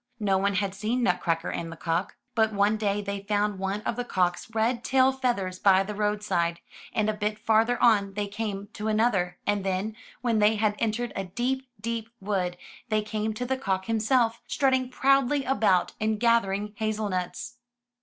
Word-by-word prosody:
No 195 -3 +2
one 200 0 +1
had 195 0 0
seen 220 +5 -1
Nutcracker 175 -4 0
and 165 -1 -4
the - - -7
cock. 165 +3 -2 0.2
But 220 -3 +2
one 205 +1 +3
day 205 -1 -1
they 200 0 -3
found 205 -1 0
one 195 +2 -2
of 225 - -2
the 245 - -1
cock's 180 -4 0
red 235 +2 +1
tail 265 0 +4
feathers 235 -9 -1
by 195 -1 +5
the 210 +2 -5
roadside, 205 -5 0 0.3
and 215 -1 0
a 215 - +1
bit 210 0 -2
farther 225 +2 +2
on 200 -4 +3
they 205 0 -1
came 205 -1 -4
to 210 - -4
another, 215 -5 +1
and 205 -1 +1
then, 195 +3 -2 0.3
when 235 -3 +1
they 210 +1 +4
had 215 -1 +2
entered 230 +1 -1
a 195 - -2
deep, 255 +7 -2
deep 225 +1 -3
wood, 190 -3 -1 0.3
they 215 -1 +1
came 215 0 -2
to 250 - -3
the 265 +1 -1
cock 190 -7 -1
himself, 230 +1 +1
strutting 260 -3 +1
proudly 275 +1 +3
about, 215 -9 +2
and 215 -1 0
gathering 210 -3 +2
hazel 215 -1 -1
nuts. 185 +6 -4
210 Hz, 185 wpm, -27 LUFS, 195-230 Hz, 0.3 s, by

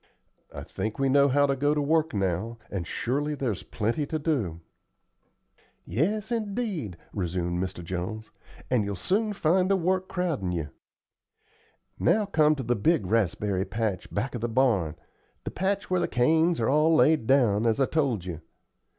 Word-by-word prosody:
I - - -7
think 110 0 -4
we 135 0 +1
know 140 +1 +5
how 145 +1 +3
to 140 -1 +1
go 145 +2 +1
to - - +1
work 160 +2 +1
now, 100 +3 -2
and 90 -4 -3
surely 145 +9 -1
there's 125 -8 -2
plenty 120 +8 -2
to 155 - -2
do." 130 - -1 1.3
"Yes, 195 - -1
indeed," 205 - -3 0.2
resumed 90 -1 -2
Mr. 90 -2 -6
Jones; 95 +6 -5 0.4
"and 125 -4 +3
you'll 100 0 -3
soon 205 - 0
find 185 -1 +2
the 195 - +4
work 185 +1 0
crowdin' 160 - -1
you. 80 -4 -3 1.3
Now 215 -1 +3
come 155 -5 +3
to 135 - -4
the 120 +1 +1
big 115 - +2
raspberry 100 -1 0
patch 105 -3 -3
back 115 +7 -2
of 120 - -4
the 120 - -1
barn, 110 - +2 0.5
the - - -5
patch 195 +1 -2
where 185 - +3
the - - 0
canes 160 +7 +2
are 115 - +1
all 155 +3 +4
laid 155 -6 +4
down, 115 -5 +3
as 110 +2 +1
I 135 - +4
told 130 - 0
you. 85 -3 -6
130 Hz, 170 wpm, -27 LUFS, 100-160 Hz, 1.3 s, know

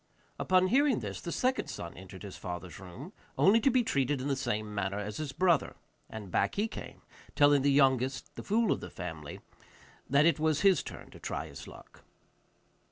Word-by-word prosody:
Upon 185 0 +3
hearing 275 +1 +3
this, - - -5
the 170 - -5
second 255 +8 0
son 85 - -6
entered 95 +1 -11
his 100 -2 -8
father's 90 0 -7
room, 120 - -10 0.2
only 205 +4 +6
to 270 - +3
be 255 -1 +3
treated 140 - 0
in 135 +3 -3
the 140 - +1
same 110 -5 -2
manner 100 -1 -2
as 105 0 -4
his 150 -3 -4
brother; 175 -1 +2 0.3
and 105 -4 -8
back - - +1
he 210 +2 +1
came - - -9 0.3
telling 145 -1 +5
the 140 +1 +3
youngest, 135 -1 +2
the - - -7
fool 220 +1 +1
of - - +1
the 90 - -8
family, 80 -4 -7 0.7
that 140 +3 +5
it 165 -1 +3
was 155 -1 +1
his 195 -2 +5
turn - - -10
to - - -13
try - - -4
his - - -10
luck. - - -14
140 Hz, 195 wpm, -31 LUFS, -, 0.7 s, only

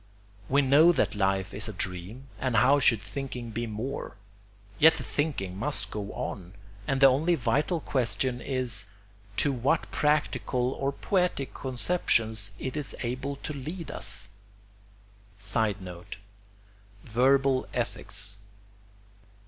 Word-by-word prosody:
We 140 +2 +4
know 145 +6 +6
that 145 - +1
life 95 -1 0
is - - -2
a - - -5
dream, 95 +8 -5
and 130 -3 -1
how 135 +6 +5
should 115 -6 +3
thinking 125 -1 -5
be 115 +2 -3
more? 115 +6 -5 0.6
Yet 160 +2 +7
the - - -5
thinking 135 - -2
must 140 +9 -3
go 105 -1 -4
on, 90 0 -6 0.3
and 135 - +1
the 135 - +7
only 150 +6 +4
vital 145 +6 +1
question 125 -1 -1
is 120 -7 0 0.5
to 145 - +3
what 135 +5 0
practical 145 -4 +1
or 135 +1 -1
poetic 180 -3 -1
conceptions 115 - 0
it 130 +6 -4
is 150 -2 -3
able 130 +4 -3
to 150 +2 -6
lead 155 +5 -6
us. 105 -2 +1 1.1
[Sidenote: 100 -3 -2 0.9
Verbal 130 +3 +3
ethics. 100 0 -2
130 Hz, 125 wpm, -28 LUFS, 105-140 Hz, 1.1 s, Yet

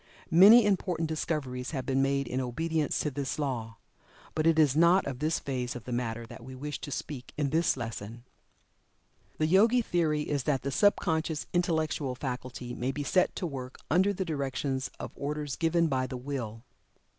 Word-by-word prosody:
Many 205 +7 +9
important 180 -5 0
discoveries 145 -5 -3
have 130 - -3
been 135 +1 +1
made 140 -1 +1
in 130 +2 -1
obedience 155 +5 -1
to 150 - -1
this 140 0 -3
law. 120 -7 -3 0.6
But 155 +1 +1
it 165 -1 +4
is 150 -4 +4
not 170 +4 +5
of 130 -3 -4
this 155 +2 +1
phase 125 -3 -3
of 120 - -7
the 125 - -7
matter 115 -1 -2
that 115 - -11
we 130 +1 -9
wish 145 +2 -5
to - - -6
speak 135 -1 -6
in 145 -2 0
this 165 -2 +2
lesson. 115 -1 -6 1.1
The 155 - +1
Yogi 220 +9 +4
theory 155 -6 +1
is 145 -4 -2
that 140 -3 +1
the 140 - -2
sub 205 +8 +4
conscious 160 -2 -1
intellectual 160 -6 0
faculty 125 -2 -5
may 125 +2 -2
be 145 +1 -4
set 180 +5 +2
to - - -3
work 130 -5 -6
under 185 +5 +4
the 190 -1 -3
direction 140 -3 -2 0.2
of - - -6
orders 145 -1 -3
given 170 +1 +2
by 130 -4 0
the 130 - -5
Will. 125 -4 -5
145 Hz, 185 wpm, -29 LUFS, 130-160 Hz, 1.1 s, Many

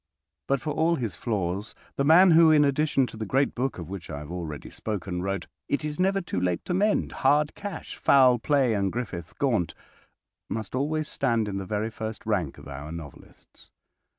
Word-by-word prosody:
But, 140 0 +2
for 155 - -2
all 160 +3 +2
his 115 - -3
flaws, 100 -1 -2 0.2
the 140 - 0
man 170 +5 +7
who, 165 0 +7
in 150 -2 +6
addition 140 -1 +2
to 115 - -10
the 110 - -3
great 135 +6 +2
book, 130 +2 -2
of 85 -3 -7
which 95 -1 -7
I 80 - -5
have 75 +2 -8
already 80 -5 -6
spoken, 95 -4 -4
wrote 100 +1 -2 0.2
"It 145 +1 0
is 150 +1 -4
Never 195 +1 +2
Too 125 - -3
Late 90 -1 -1
to 180 - -2
Mend," 205 +4 +1
"Hard 150 +1 +3
Cash," 205 -1 -7
"Foul 130 -3 +5
Play," 135 -2 +2
and 100 -2 0
"Griffith 105 -8 -5
Gaunt," 110 - 0 0.7
must 110 -2 -4
always 150 +4 -1
stand 115 -5 0
in 100 -1 -3
the 95 - -6
very 110 +2 -2
first 110 0 -6
rank 95 -10 -1
of - - -12
our 70 +2 -7
novelists. 80 -4 -12
115 Hz, 195 wpm, -26 LUFS, 95-150 Hz, 0.7 s, man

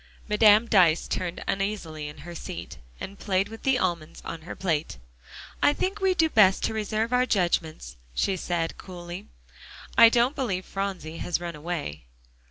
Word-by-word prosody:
Madame 210 +1 +6
Dyce 180 -7 +4
turned 180 -1 -3
uneasily 195 -7 -2
in 150 0 -10
her 175 - -7
seat, 85 - -7 0.2
and 200 +1 -7
played 195 0 0
with 225 0 -10
the 265 -1 +2
almonds 170 -7 -2
on 165 - -6
her - - -5
plate. 165 - -1 0.6
"I 290 - +5
think 390 +6 -2
we 380 -1 +3
do 325 -2 +4
best 200 -9 +4
to - - 0
reserve 220 +2 -1
our 250 +1 +3
judgments," 165 - -1 0.2
she 190 - +1
said 170 -2 -2
coolly. 175 0 -8 0.7
"I 230 0 +10
don't 240 +4 +2
believe 195 -8 -2
Phronsie 190 -5 -4
has 175 - -1
run 170 -1 -5
away." 150 - -5
190 Hz, 165 wpm, -26 LUFS, 170-220 Hz, 0.7 s, I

